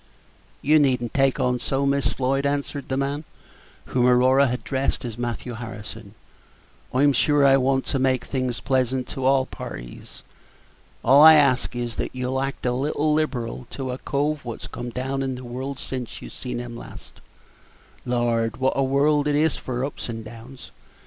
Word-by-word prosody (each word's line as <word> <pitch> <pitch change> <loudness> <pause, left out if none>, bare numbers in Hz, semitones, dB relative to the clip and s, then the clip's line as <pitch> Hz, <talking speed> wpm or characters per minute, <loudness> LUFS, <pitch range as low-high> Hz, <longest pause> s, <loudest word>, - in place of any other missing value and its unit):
"You 155 +2 +5
need 135 -4 +3
n't 120 - -5
take 135 -1 +2
on 125 0 +1
so, 135 +2 -1
Miss 140 0 +2
Floyd," 135 +1 0
answered 140 0 -2
the 130 - -1
man, 140 +2 -1 0.6
whom 125 -1 +1
Aurora 130 +2 +5
had 125 +1 -2
addressed 135 -1 -2
as 115 -3 -5
Matthew 120 +1 -4
Harrison; 110 -2 -8 0.8
"I'm 140 +2 +4
sure 145 +2 +3
I 135 0 +6
want 135 0 +1
to 135 - -1
make 130 -1 +1
things 130 -3 -2
pleasant 130 -1 0
to 130 - -4
all 135 0 +4
parties. - - -9 0.8
All 135 +4 +7
I 160 +1 +10
ask 135 -4 +3
is, 120 -1 -4
that - - -3
you'll 130 +1 -1
act 135 -3 -4
a 125 - +2
little 145 +4 0
liberal 125 -6 -2
to 130 -2 -4
a 125 - -5
cove 145 +1 -1
wot's 120 -2 -6
come 120 0 -6
down 130 +3 -3
in 135 -1 -2
the 125 - -8
world 130 +3 -5
since 130 -3 -5
you - - -10
see 125 -1 -6
him 120 -1 -6
last. 120 - -12 0.8
Lord, 120 -2 0
wot 130 0 +1
a 135 - +2
world 145 +2 +2
it 145 - +2
is 155 0 +2
for 125 0 -3
ups 140 - -6
and 115 -1 -6
downs! 115 +4 -11
130 Hz, 180 wpm, -24 LUFS, 120-140 Hz, 0.8 s, I